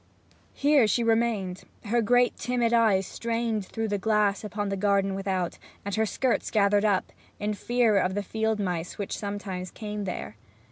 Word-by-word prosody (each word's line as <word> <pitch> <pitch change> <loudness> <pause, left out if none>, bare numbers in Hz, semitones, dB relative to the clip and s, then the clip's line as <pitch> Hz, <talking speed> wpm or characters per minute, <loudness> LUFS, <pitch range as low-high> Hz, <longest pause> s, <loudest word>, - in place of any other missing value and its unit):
Here 285 -5 +4
she 235 +3 +1
remained, 225 -5 +1 0.2
her 235 +3 +2
great 245 +2 +3
timid 240 -1 0
eyes 215 -5 +4
strained 230 -3 -2
through 225 -1 -3
the 205 0 -1
glass 210 -1 +1
upon 205 -1 -3
the 195 - -1
garden 195 0 +1
without, 190 -2 -2 0.3
and 200 - -3
her 220 +2 +1
skirts 255 +4 0
gathered 205 -1 +3
up, 205 -3 +1 0.3
in 210 +1 -1
fear 235 0 +2
of 185 0 +1
the 205 - -1
field 220 +2 -1
mice 180 -3 -3
which 200 - -3
sometimes 200 -3 -5
came 210 0 -5
there. 145 - -5
210 Hz, 170 wpm, -27 LUFS, 195-230 Hz, 0.3 s, Here